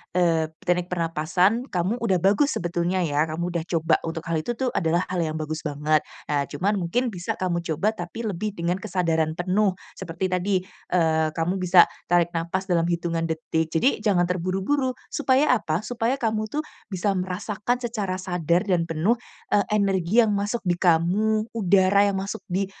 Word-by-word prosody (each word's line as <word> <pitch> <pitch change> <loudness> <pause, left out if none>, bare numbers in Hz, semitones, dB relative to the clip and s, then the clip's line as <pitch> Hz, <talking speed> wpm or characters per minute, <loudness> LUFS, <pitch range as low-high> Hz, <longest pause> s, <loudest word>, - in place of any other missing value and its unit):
eee, 165 -3 +2 0.2
teknik 180 0 +1
pernapasan 180 - +1
kamu 180 +5 0
udah 195 -6 +1
bagus 210 +10 +3
sebetulnya 175 +1 -1
ya, 150 -2 +1
kamu 170 +3 -3
udah 170 -2 -2
coba 165 -2 +2
untuk 165 0 -4
hal 165 -1 0
itu 155 - -3
tuh 255 +2 -1
adalah 170 +1 +1
hal 185 - -1
yang 155 -1 -3
bagus 155 0 -3
banget. 150 +1 +1 0.3
Nah, 145 -1 +2
cuman 200 +3 -1
mungkin 215 +9 0
bisa 180 -3 -4
kamu 180 -2 0
coba 165 +7 +1
tapi 175 +4 -6
lebih 210 +1 -3
dengan 170 +2 -1
kesadaran 165 -6 0
penuh. 185 +3 +1 0.2
Seperti 170 +3 -3
tadi, 185 +1 +1 0.3
eee, 160 -3 +2
kamu 170 +3 0
bisa 180 -1 +7 0.2
tarik 175 -1 +3
napas 170 +3 -2
dalam 170 -1 +3
hitungan 170 -1 -1
detik. 160 0 -1
Jadi 230 - +2
jangan 195 -5 +3
terburu-buru. 190 +10 0 0.2
Supaya 270 -1 +3
apa? 160 -4 -1
Supaya 240 +2 -1
kamu 215 -2 -1
tuh 300 - -1 0.3
bisa 190 +2 0
merasakan 205 +6 -2
secara 210 -6 -2
sadar 175 -2 0
dan 180 -3 +2
penuh 165 +8 +2 0.4
eee, 205 - +3
energi 195 0 +2
yang 210 -2 0
masuk 205 +4 -1
di 175 - +3
kamu, 190 +6 +2
udara 200 -1 +4
yang 195 - -2
masuk 195 0 -5
di, 190 +2 0
180 Hz, 170 wpm, -24 LUFS, 165-205 Hz, 0.4 s, bisa